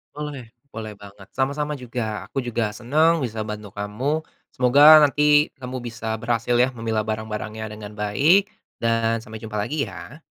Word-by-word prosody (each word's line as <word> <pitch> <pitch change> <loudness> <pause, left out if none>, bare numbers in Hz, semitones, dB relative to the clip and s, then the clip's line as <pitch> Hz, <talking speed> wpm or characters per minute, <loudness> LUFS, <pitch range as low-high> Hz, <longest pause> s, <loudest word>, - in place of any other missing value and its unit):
Boleh. 145 -6 -6 0.2
Boleh 110 -3 -7
banget. 100 -1 -14
Sama-sama 145 +3 -1
juga. 115 -6 -5
Aku - - -9
juga 120 -3 -1
senang 155 +7 +2
bisa 110 -2 -4
bantu 105 -1 -7
kamu. 120 +10 -2 0.3
Semoga 145 +5 +8
nanti 150 +1 +4
kamu 130 0 -6
bisa 115 -2 -5
berhasil 115 +1 0
ya 125 +2 +4
memilah 115 -2 -1
barang-barangnya 110 0 -4
dengan 105 -1 -9
baik 150 - +3 0.3
dan 115 0 +1
sampai 110 -2 -10
jumpa 110 -1 -6
lagi 140 +8 -1
ya. 150 +5 -11
115 Hz, 150 wpm, -23 LUFS, 110-140 Hz, 0.3 s, Semoga